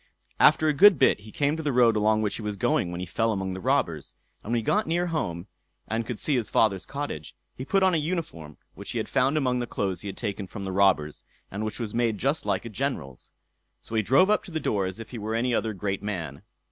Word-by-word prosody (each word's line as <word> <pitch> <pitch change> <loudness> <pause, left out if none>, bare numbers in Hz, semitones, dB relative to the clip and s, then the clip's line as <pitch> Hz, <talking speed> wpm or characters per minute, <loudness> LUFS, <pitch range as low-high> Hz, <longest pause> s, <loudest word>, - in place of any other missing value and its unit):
After 155 - +5
a 155 - +3
good 195 +4 +7
bit - - +4
he 105 +1 -13
came 145 +4 0
to 160 - -4
the 150 -2 -1
road 120 -3 +4
along 110 0 +2
which 105 - -1
he - - -7
was 105 -1 -3
going 90 -2 +1
when 90 0 -5
he 90 - -3
fell 115 +6 0
among 95 -2 -2
the 95 - -5
robbers, - - -1 0.3
and 110 - -7
when 120 - +2
he 115 - -1
got 210 - +1
near 175 +2 +1
home, 90 - -3 0.4
and 115 0 -2
could 120 - -4
see 145 - 0
his 120 -4 -1
father's 95 -4 +2
cottage, 140 - -5 0.2
he 130 - -6
put 195 +5 +2
on 185 -1 +4
a - - +3
uniform 150 - -4 0.2
which 100 - -8
he - - -3
had 110 - -2
found 135 +3 +2
among 125 -4 +1
the 120 - -3
clothes 95 -6 -2
he - - -7
had 100 - -6
taken 100 -3 -4
from 100 +1 -7
the 95 - -4
robbers, 95 -6 +2 0.3
and 100 +2 -4
which 110 +1 -4
was 110 -3 -4
made 115 -2 +1
just 140 +7 -1
like - - 0
a - - -5
general's. 105 - -4 0.5
So - - -11
he 110 - +3
drove 135 - +4
up 210 - +2
to 185 - -10
the 160 - -2
door 100 -9 0
as 95 +4 -6
if 115 - -9
he 120 - -6
were 110 +2 -3
any 125 +2 0
other 115 -1 0
great 100 -1 -3
man. 85 -9 -5
110 Hz, 260 wpm, -26 LUFS, 100-140 Hz, 0.5 s, good